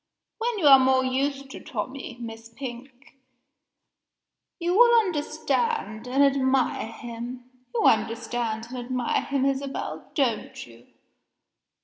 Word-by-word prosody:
When 465 0 -1
you 355 - -1
are 270 -2 +9
more 260 0 +3
used 275 +1 -1
to - - -8
Tommie, 255 +2 -6
Miss 225 -1 -8
Pink, 260 +2 -10 1.4
you 345 0 -1
will 475 +1 +7
understand 360 - -1
and 270 +3 +3
admire 265 -4 +2
him. 240 +2 -8 0.3
You - - +1
understand 225 0 +1
and 255 0 -6
admire 245 0 -1
him, 275 -1 -1
Isabel 275 0 -3
don't 245 -8 -1
you? 115 0 -17
260 Hz, 115 wpm, -26 LUFS, 235-280 Hz, 1.4 s, are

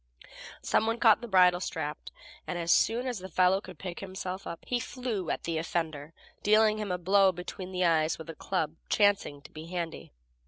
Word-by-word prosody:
Some 220 - +2
one 225 +1 0
caught 225 -1 +5
the 240 - -6
bridle 180 -3 +5
strap, 155 -4 -4 0.5
and, 180 - -3
as 170 0 0
soon 235 +3 +3
as 245 -5 -3
the 190 +1 -8
fellow 185 +1 +3
could 185 -4 -11
pick 180 +1 -6
himself 190 0 -6
up, 170 - -7
he 245 - 0
flew 235 - -4
at - - -2
the 165 -1 -1
offender, 160 -3 -3 0.3
dealing 215 0 +4
him 210 -3 -3
a 180 - 0
blow 190 +2 +4
between 180 +1 -7
the 180 -1 0
eyes 160 -1 +2
with 160 - -10
a 165 - -6
club 160 -5 -2 0.2
chancing 200 -9 +2
to - - -14
be 155 +1 -9
handy. 170 -2 -5
185 Hz, 200 wpm, -29 LUFS, 165-205 Hz, 0.5 s, caught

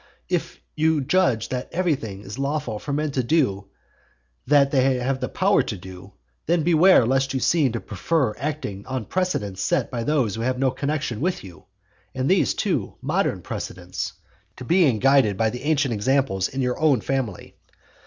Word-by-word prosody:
If - - -2 0.2
you 155 -1 +2
judge 135 -6 +1
that 125 -1 -4
everything 140 - -1
is 105 +6 -8
lawful 140 -6 -2
for 145 - -6
men 150 +1 -1
to 135 - 0
do 120 -8 +1 0.8
that 140 0 +4
they 130 -1 +3
have 130 +2 -1
the - - -3
power 195 +2 +3
to 105 - -4
do, 90 0 -11 0.3
then 170 0 +2
beware 170 -4 +5
lest 135 +2 +1
you - - +1
seem 140 -3 +2
to 115 - -2
prefer 125 - -1
acting 140 -9 -4
on 130 -4 -3
precedents 105 - -2
set - - 0
by 120 -2 -3
those 130 -7 +1
who 115 - -4
have 125 +2 0
no 130 0 +2
connexion 140 -3 -3
with 180 +2 -1
you, 90 -5 -13 0.5
and 130 0 -1
these, 190 +1 +2
too, 160 - -1
modern - - -1
precedents, 90 +1 -5 0.4
to 125 - -8
being 165 -7 +3
guided 130 -5 +3
by 110 -1 +1
the 125 - -6
ancient 145 -3 +1
examples 105 -4 +1
in 135 0 -3
your 125 0 -1
own 145 -7 +3
family. 130 -8 -3
130 Hz, 175 wpm, -23 LUFS, 110-150 Hz, 0.8 s, beware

